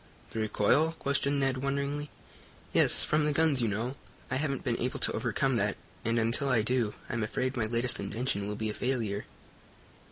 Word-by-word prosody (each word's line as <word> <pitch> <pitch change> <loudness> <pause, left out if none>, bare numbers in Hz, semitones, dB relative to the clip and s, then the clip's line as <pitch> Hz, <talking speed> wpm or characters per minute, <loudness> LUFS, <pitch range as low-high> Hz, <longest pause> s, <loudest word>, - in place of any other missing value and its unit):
"The 115 - -4
recoil?" 110 +9 +2
questioned 140 0 0
Ned, 135 -1 +1
wonderingly. 140 +2 -2 0.6
"Yes, - - +6
from 150 0 +2
the 150 - +2
guns, 150 -3 +3
you 115 - +2
know. 115 +6 -2 0.4
I 130 - +1
haven't 140 -2 -2
been 120 -2 -1
able 125 +2 -2
to - - +3
overcome - - 0
that, - - 0 0.3
and, 115 +1 0
until 115 +5 +2
I 115 -4 +3
do, 120 -2 0
I'm 120 - -2
afraid 130 +5 -1
my 115 -3 0
latest 120 +2 0
invention 110 -3 -2
will 105 - -3
be 110 0 -2
a - - -6
failure." 115 -6 -2
125 Hz, 185 wpm, -30 LUFS, 110-140 Hz, 0.6 s, Yes